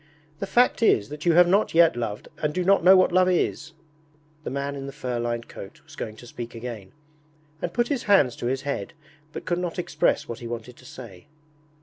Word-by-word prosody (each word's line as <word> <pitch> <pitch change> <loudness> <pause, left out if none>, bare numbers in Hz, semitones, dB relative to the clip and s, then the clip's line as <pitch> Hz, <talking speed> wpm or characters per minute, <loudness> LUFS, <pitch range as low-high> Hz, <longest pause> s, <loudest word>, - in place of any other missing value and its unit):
'The 195 - -3
fact 245 +2 +3
is 110 - +3
that 150 +3 -6
you 170 - +5
have 175 +1 +6
not 195 0 +2
yet 170 -1 +5
loved 110 -3 -4
and 150 -1 -2
do 180 - 0
not 195 -2 +4
know 190 +2 +8
what 185 - +4
love 185 +1 +4
is.' 165 -3 -1 0.7
The - - -4
man 140 +2 -3
in 135 0 -6
the - - -6
fur 125 -4 -4
lined 120 0 -3
coat 95 - -11
was - - -16
going 110 - -6
to 120 - -13
speak 120 0 -8
again, 115 -5 -7 0.7
and 170 - -3
put 240 +5 0
his 280 -5 -2
hands 145 -12 +4
to 120 - -3
his 135 +1 -2
head, 140 -9 -4 0.4
but - - -8
could 175 0 -1
not 175 -2 -4
express 180 - 0
what 115 0 -6
he 120 - -7
wanted 120 +1 -7
to 130 - -17
say. 115 -5 -12
140 Hz, 225 wpm, -25 LUFS, 120-180 Hz, 0.7 s, know